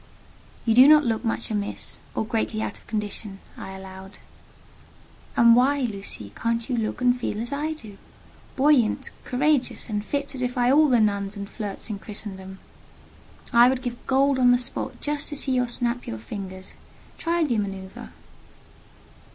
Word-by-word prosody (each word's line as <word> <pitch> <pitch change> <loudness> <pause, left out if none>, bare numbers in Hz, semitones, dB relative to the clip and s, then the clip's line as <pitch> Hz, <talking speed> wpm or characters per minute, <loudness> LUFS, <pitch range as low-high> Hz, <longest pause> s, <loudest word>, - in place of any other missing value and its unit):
"You 225 - +3
do 255 +4 +8
not 305 0 +7
look 225 -1 0
much 225 -1 -2
amiss, 205 -1 -3 0.2
or - - 0
greatly 220 0 -1
out - - -3
of - - -24
condition," 210 -2 -4 0.2
I 190 - -8
allowed. 190 0 -10 1.2
"And 235 0 +7
why, 275 +3 +3
Lucy, 200 - -3
can't 230 0 -1
you 255 - -1
look 225 +1 -2
and 245 0 +4
feel 215 -3 -3
as 235 +4 -2
I 300 +3 -1
do—buoyant, 265 +2 -1
courageous, 275 -1 +1
and 210 -1 -2
fit 285 +5 -2
to 270 -2 -5
defy 250 0 +1
all 300 +2 +5
the 245 -2 +4
nuns 200 -1 0
and 200 0 -5
flirts 210 +1 -5
in 200 - -4
Christendom? 190 -2 -6 1.0
I 240 +1 +7
would 260 -1 -1
give 245 -1 -6
gold 270 0 +3
on 250 -1 +5
the 245 - +6
spot 250 +1 -4
just 295 -1 -2
to 295 - -5
see 280 -1 0
you 250 -1 +2
snap 240 0 -1
your 110 - -4
fingers. 190 - -8 0.5
Try 335 0 +1
the 240 -8 +1
manoeuvre." 195 -2 -6
235 Hz, 165 wpm, -25 LUFS, 205-265 Hz, 1.2 s, do